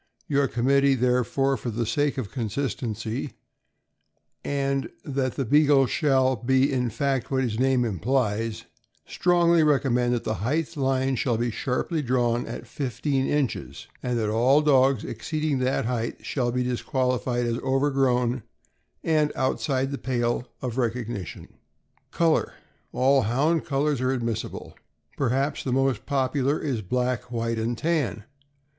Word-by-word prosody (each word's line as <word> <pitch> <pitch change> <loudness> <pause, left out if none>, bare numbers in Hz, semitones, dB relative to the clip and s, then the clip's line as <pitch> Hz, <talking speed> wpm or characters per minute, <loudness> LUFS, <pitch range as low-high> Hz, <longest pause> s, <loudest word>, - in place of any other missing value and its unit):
Your 140 -1 +2
committee, 135 +3 +3
therefore, 125 +2 +1
for 120 - -5
the 115 +1 -2
sake 145 +6 0
of 120 -6 -4
consistency, 115 0 -3 1.1
and 140 -1 -1 0.2
that 135 -3 -1
the 135 - -1
Beagle 145 +1 +5
shall 130 -1 +2
be 130 +4 +2
in 125 -2 0
fact 135 +2 -1
what 130 -1 +1
his 115 -3 -2
name 130 -1 +3
implies, 110 +1 -1 0.4
strongly 170 -1 +3
recommend 125 -5 +2
that 120 - -3
the 110 - -1
height 150 +8 -1
line 135 -1 0
shall 120 -1 0
be 120 +1 -1
sharply 140 +7 -2
drawn 120 -2 0
at 115 - -6
fifteen 135 +1 -2
inches, 115 - -2 0.2
and 125 -1 -1
that 110 -2 0
all 130 +7 +4
dogs 135 -4 +4
exceeding 150 +4 -2
that 130 -2 0
height 115 -1 -3
shall 125 -3 -1
be 125 +1 0
disqualified 125 -1 -1
as 120 0 -1
overgrown 130 -3 +1 0.6
and 155 -2 +2
outside 135 0 0
the 140 - -4
pale 120 -1 -1 0.2
of 125 -1 -3
recog 120 -2 -1
nition. 100 -7 -6 0.6
Color. 165 -2 +1 0.2
— - - -42
All 135 +1 +3
Hound 140 +9 +1
colors 145 -2 0
are 130 0 +1
admissible. 115 -4 -4 0.4
Perhaps 135 +3 0
the 130 - -2
most 130 -2 0
popular 135 0 +1
is 130 -7 -2
black, 125 +4 -2
white, 115 -1 -1
and 115 +1 -1
tan. 140 - -1
130 Hz, 140 wpm, -25 LUFS, 120-140 Hz, 1.1 s, Beagle